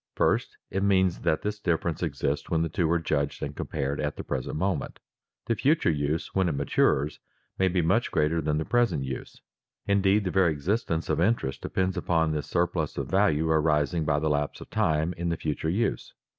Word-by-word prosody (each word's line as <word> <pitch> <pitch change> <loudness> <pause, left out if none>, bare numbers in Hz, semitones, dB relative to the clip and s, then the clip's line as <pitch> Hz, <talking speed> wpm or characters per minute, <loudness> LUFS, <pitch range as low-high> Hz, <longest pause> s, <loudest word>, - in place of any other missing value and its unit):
First, - - +1
it 95 - -1
means 95 -3 +2
that 80 - 0
this 105 0 -3
difference 85 -4 -1
exists 70 -3 -2
when 80 -1 +1
the 80 - -1
two 85 0 0
are 85 - +4
judged 75 -3 -1
and - - -4
compared 70 +1 -3
at 75 -1 -2
the - - -6
present 65 - -3
moment. 95 +5 -2 0.5
The 115 - +1
future 135 - +2
use 75 +1 -2
when 95 -2 +2
it - - -1
matures 70 +1 +1 0.4
may 95 - +4
be 90 -1 +1
much 95 +9 +2
greater 80 +2 +1
than 75 0 0
the 80 - -2
present 115 - +1
use; 65 -1 -6 0.5
indeed, 100 +1 +3
the 90 - -2
very 95 -3 +3
existence 80 +2 -1
of 80 +1 0
interest 90 - 0
depends 95 0 -1
upon 80 -2 +1
this 75 -3 -3
surplus - - -1
of - - -4
value 90 -5 +3
arising 80 +1 +2
by 75 -1 +1
the 80 +1 0
lapse 75 0 -1
of - - -12
time 80 +2 +1
in 85 0 -2
the 85 - -1
future 80 +1 -2
use. 105 +8 -1
80 Hz, 200 wpm, -27 LUFS, 75-95 Hz, 0.5 s, are